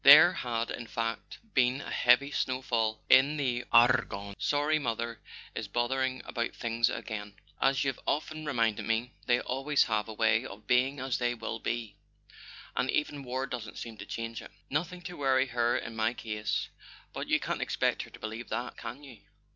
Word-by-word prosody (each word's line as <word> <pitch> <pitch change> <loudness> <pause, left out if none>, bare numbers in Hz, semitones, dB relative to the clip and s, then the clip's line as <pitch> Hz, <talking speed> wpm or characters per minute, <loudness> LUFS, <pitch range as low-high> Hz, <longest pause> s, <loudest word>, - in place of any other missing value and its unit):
(There 155 +6 +10
had, 115 -1 -2
in 120 - -5
fact, 115 0 -3 0.2
been 130 0 +3
a - - -7
heavy 125 +4 +4
snow 130 -2 -1
fall 110 -3 0
in 135 +4 +6
the 125 -4 -1
Ar 120 +1 +6
gonne). 100 0 -7
"Sorry 150 +2 +2
mother 115 -3 -3 0.3
is 110 - -4
bothering 130 +4 0
about 120 0 -3
things 115 0 +1
again; 105 -2 -5 0.3
as 135 0 +3
you've 135 -3 -1
often 155 +1 -1
reminded 115 -7 +1
me, 115 +3 0 0.2
they 120 -1 +4
always 135 +3 +2
have 110 -1 0
a 110 - -6
way 110 +1 +3
of 105 -4 -10
'being 130 +5 +2
as 130 -1 -1
they 120 -1 +1
will 115 -1 -4
be,' 115 -2 -3 0.8
and 130 - 0
even 150 -1 0
war 130 0 -2
doesn't 120 -4 -6
seem 115 -1 -6
to - - -8
change 115 -1 -4
it. - - -11 0.2
Nothing 175 +5 -2
to 180 - -6
worry 135 -2 +3
her 120 -2 +1
in 115 - -6
my 110 +2 +1
case—but 105 -2 -5
you - - +3
can't - - -3
expect - - +1
her - - -8
to - - -13
believe 110 +2 -6
that, 120 +3 -3
can 120 +5 -7
you 130 -6 -12
120 Hz, 185 wpm, -30 LUFS, 115-135 Hz, 0.8 s, There